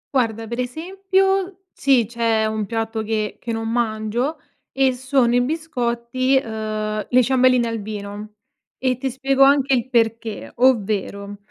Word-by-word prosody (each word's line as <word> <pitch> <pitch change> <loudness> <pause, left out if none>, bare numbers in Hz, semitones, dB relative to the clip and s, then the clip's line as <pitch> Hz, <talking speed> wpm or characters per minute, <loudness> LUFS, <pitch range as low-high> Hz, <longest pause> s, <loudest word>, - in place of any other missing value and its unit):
Guarda, 225 -3 0
per 235 +2 -5
esempio, 385 +7 -1
sì, 265 -4 +3
c'è 230 -1 +1
un 215 -1 -2
piatto 225 0 -2
che 215 -1 -2
che 235 - -5
non 225 0 -3
mangio 235 +4 -1 0.3
e 265 -1 +2
sono 260 -1 +1
i 245 - +4
biscotti, 255 -3 -1
uhm, 215 -1 -3
le 250 0 +5
ciambelline 255 -1 +3
al 230 -1 -3
vino, 210 0 -7 0.4
e 255 -1 0
ti 270 - -1
spiego 270 +1 -1
anche 275 0 +5
il 255 0 0
perché, 230 -2 -1
ovvero, 205 -4 +1
235 Hz, 140 wpm, -21 LUFS, 220-265 Hz, 0.4 s, le